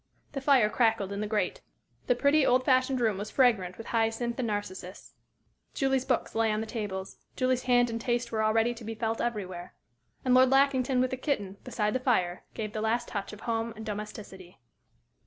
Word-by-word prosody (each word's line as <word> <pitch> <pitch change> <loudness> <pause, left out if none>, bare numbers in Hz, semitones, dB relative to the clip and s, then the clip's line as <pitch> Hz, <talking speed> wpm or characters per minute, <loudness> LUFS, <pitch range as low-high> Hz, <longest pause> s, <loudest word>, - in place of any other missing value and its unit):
The 275 - -4
fire 265 -5 +5
crackled 220 -3 +1
in 200 +1 -3
the 210 - -2
grate. 210 0 -1 0.5
The 245 - +3
pretty, 280 +4 +3
old 255 0 +3
fashioned 255 0 +3
room 220 -5 +1
was 210 +1 -5
fragrant 220 -9 +2
with 225 - -8
hyacinth 230 +1 -1
and 245 - 0
narcissus; 190 -3 -5 0.6
Julie's 270 -1 +1
books 255 -3 0
lay 225 -1 +2
on 215 - 0
the 220 - -3
tables; 205 -4 -5 0.2
Julie's 255 -1 +1
hand 245 -1 +3
and 230 0 -4
taste 240 -1 -1
were 220 -1 0
already 225 +2 +2
to 235 - -11
be 225 +1 -5
felt 225 0 -2
everywhere. 185 -6 -4 0.5
And 255 - +3
Lord 255 0 +6
Lackington 265 -1 +3
with 255 - 0
the 260 - -2
kitten, 205 -9 -2
beside 215 -4 -1
the 255 - 0
fire, 185 -9 0
gave 215 -1 -4
the 215 - -3
last 235 +2 0
touch 200 -2 -4
of 210 - -11
home 230 0 -2
and 220 0 -8
domesticity. 210 -3 -7
225 Hz, 195 wpm, -29 LUFS, 210-255 Hz, 0.6 s, Lord